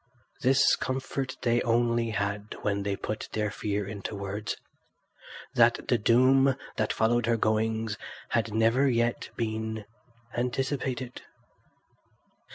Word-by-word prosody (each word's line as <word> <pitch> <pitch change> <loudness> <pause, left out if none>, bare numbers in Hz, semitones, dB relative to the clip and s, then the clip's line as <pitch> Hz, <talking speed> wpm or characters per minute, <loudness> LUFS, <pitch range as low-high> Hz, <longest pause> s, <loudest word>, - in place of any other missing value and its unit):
This 135 +2 +5
comfort 130 0 -3
they 120 -1 +3
only 115 0 +2
had 100 0 -2
when 100 -1 0
they 100 0 -1
put 110 +2 -5
their 105 -1 0
fear 105 -1 -2
into 100 0 -5
words—that 100 +2 -2
the - - +3
doom 130 +4 +5 0.2
that 110 -2 0
followed 115 +1 +2
her 115 -1 +3
goings 110 0 0 0.3
had 115 -1 0
never 115 +5 +3
yet 120 -1 0
been 110 -1 -3 0.5
anticipated. 130 0 -2
115 Hz, 110 wpm, -28 LUFS, 105-125 Hz, 0.5 s, This